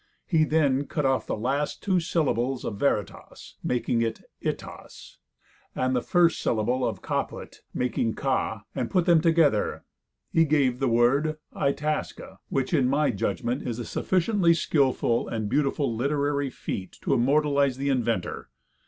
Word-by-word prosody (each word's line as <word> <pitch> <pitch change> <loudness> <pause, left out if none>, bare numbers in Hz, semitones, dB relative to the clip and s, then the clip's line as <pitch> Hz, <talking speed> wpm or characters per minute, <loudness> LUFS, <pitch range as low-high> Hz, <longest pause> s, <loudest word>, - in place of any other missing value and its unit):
He 160 -3 +3
then 145 -3 +1
cut 150 -3 -2
off 135 -1 +1
the - - -2
last 135 +7 -2
two 190 -3 +2
syllables 135 -7 -1
of 100 - -4
veritas, 105 -7 -3
making 120 -1 0 0.4
"Itas," - - -7 0.6
and 130 0 0
the 125 - +1
first 170 +3 +2
syllable 120 +3 0
of 105 -6 -2
caput, - - -4
making 120 -2 -1
"ca," - - -1
and, - - -2
putting 180 -3 +1
them 170 -3 +5
together, 160 -9 +2 0.5
he 165 - +5
gave 140 -5 +2
the 135 - +1
word 135 +7 +2 0.2
"Itasca," 150 +2 -2
which, 135 +4 -1
in 135 -6 +3
my 145 +3 +2
judgment, 125 +3 -2
is 120 -3 -4
a 120 - -5
sufficiently 185 -2 +2
skillful 130 -7 +1
and 110 -2 -3
beautiful 140 -1 0
literary 140 +2 0
feat 95 -6 -6
to - - +1
immortalize 140 +1 +2
the 140 +1 -1
inventor. 115 - -1
140 Hz, 145 wpm, -26 LUFS, 120-155 Hz, 0.6 s, them